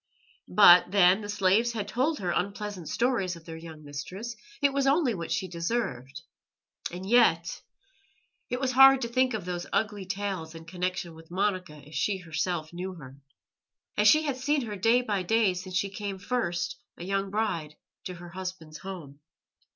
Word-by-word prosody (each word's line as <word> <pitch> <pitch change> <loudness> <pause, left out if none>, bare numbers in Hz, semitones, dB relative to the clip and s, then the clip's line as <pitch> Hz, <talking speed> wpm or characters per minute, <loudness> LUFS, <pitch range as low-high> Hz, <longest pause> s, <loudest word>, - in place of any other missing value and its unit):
But 175 - +7
then, 190 +1 +5
the 205 - -7
slaves 205 +4 +2
had 210 -3 -3
told 265 +8 0
her 180 -2 -2
unpleasant 200 -1 -3
stories 230 -8 0
of 165 -1 -14
their 165 - -7
young 160 -1 -10
mistress; 180 +11 -6 0.2
it 280 -1 +2
was 275 -1 +1
only 275 -3 +3
what 170 -4 -5
she 190 - -1
deserved. 170 - -3 0.7
And 180 +2 -7
yet.... 195 -8 +3 0.9
It 250 - -2
was 260 -1 0
hard 270 +1 +8
to 235 - -1
think 255 0 +1
of 200 -5 -5
those 175 -1 -4
ugly 210 -3 -1
tales 190 -5 -4
in 165 0 -10
connection 180 0 -3
with 160 0 -15
Monica 185 -3 -1
as 150 - -14
she 200 +3 0
herself 170 -1 -3
knew 185 +2 -5
her 135 -5 -11 0.8
as 210 0 +4
she 310 +8 +6
had 280 -4 -2
seen 285 +2 +1
her 215 -3 -5
day 225 +6 +3
by 205 -5 -1
day 210 +1 +2
since 180 0 -4
she 195 +1 -1
came 200 -1 -5
first, 175 -5 -2 0.2
a - - -8
young 195 +1 -1
bride, 170 -8 -2 0.3
to 180 - -5
her 175 0 -10
husband's 180 -4 -7
home. 170 -8 -8
190 Hz, 175 wpm, -28 LUFS, 170-225 Hz, 0.9 s, hard